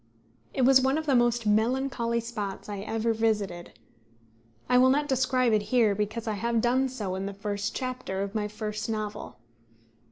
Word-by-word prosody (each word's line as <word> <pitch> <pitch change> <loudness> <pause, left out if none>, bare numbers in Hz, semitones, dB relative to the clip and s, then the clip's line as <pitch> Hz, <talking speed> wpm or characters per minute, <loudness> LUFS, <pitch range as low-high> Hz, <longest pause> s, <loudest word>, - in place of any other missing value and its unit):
It 260 - 0
was 265 +1 +6
one 265 +3 +2
of 315 - -3
the 285 - +2
most 240 -1 +2
melancholy 235 +2 +1
spots 215 -4 -5
I 205 -1 -5
ever 225 +3 -1
visited. 210 -6 -2 0.9
I 250 0 +4
will 260 +1 +6
not 290 +2 +2
describe 255 -3 +2
it 215 - +3
here, 230 -5 +4
because 215 +3 -3
I 220 - 0
have 230 +3 0
done 255 +3 +2
so 210 -7 -4
in 190 +1 -3
the 200 - -6
first 200 0 -3
chapter 255 -7 -3
of 200 0 -5
my 210 -2 -1
first 215 +1 -5
novel. 215 -1 -4
225 Hz, 180 wpm, -27 LUFS, 210-255 Hz, 0.9 s, was